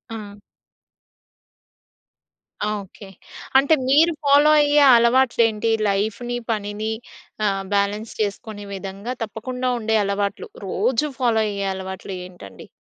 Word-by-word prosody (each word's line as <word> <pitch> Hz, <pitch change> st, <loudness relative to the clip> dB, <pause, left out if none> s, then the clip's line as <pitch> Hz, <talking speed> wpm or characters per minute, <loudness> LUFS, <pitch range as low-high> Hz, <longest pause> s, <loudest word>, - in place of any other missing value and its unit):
ఆ! 205 Hz, -1 st, -9 dB, 2.3 s
ఆ! -, -, 0 dB
ఓకె. 195 Hz, +1 st, -14 dB, 0.5 s
అంటే 280 Hz, +4 st, +4 dB, 0.2 s
మీరు 320 Hz, +5 st, +5 dB
ఫాలో 290 Hz, +2 st, +5 dB
అయ్యే 290 Hz, 0 st, +4 dB
అలవాట్లేంటి? 235 Hz, -2 st, +3 dB, 0.2 s
లైఫ్‌ని, 220 Hz, +5 st, -2 dB
పనిని 210 Hz, +1 st, -3 dB, 0.6 s
ఆహ్, 195 Hz, -1 st, -1 dB
బాలన్స్ 205 Hz, +2 st, -1 dB
చేసుకునే 205 Hz, 0 st, -4 dB
విధంగా 195 Hz, +5 st, -6 dB
తప్పకుండా 250 Hz, +4 st, -4 dB
ఉండే 220 Hz, 0 st, +1 dB
అలవాట్లు, 200 Hz, 0 st, -2 dB, 0.2 s
రోజు 260 Hz, +9 st, 0 dB
ఫాలో 235 Hz, -3 st, +2 dB
అయ్యే 200 Hz, -1 st, -3 dB
అలవాట్లు 190 Hz, +1 st, -7 dB
ఏంటండి? 135 Hz, -, -12 dB
215 Hz, 105 wpm, -22 LUFS, 200-245 Hz, 2.3 s, మీరు